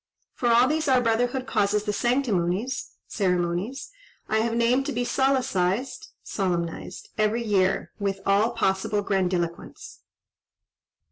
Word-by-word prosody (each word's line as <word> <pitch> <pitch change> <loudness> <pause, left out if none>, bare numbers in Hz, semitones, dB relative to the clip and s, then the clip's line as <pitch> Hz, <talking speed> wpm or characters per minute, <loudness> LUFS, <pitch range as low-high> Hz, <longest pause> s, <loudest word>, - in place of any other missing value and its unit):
For 240 - -1
all 240 +2 +6
these 310 +1 0
our 260 -2 +5
brotherhood 245 +2 0
causes 210 -3 +1
the 210 -1 -2
sanctimonies 235 -2 0
(ceremonies) 180 - -1 0.4
I 220 - +1
have 230 +1 0
named 245 +3 +2
to - - -1
be 245 +1 -1
solecised 260 - 0 0.2
(solemnised) 180 -2 -3
every 215 +2 +1
year, 195 -4 +1
with 195 -1 -1
all 200 +3 +3
possible 205 -1 0
grandiloquence. 180 -4 -2
215 Hz, 120 wpm, -25 LUFS, 190-245 Hz, 0.4 s, all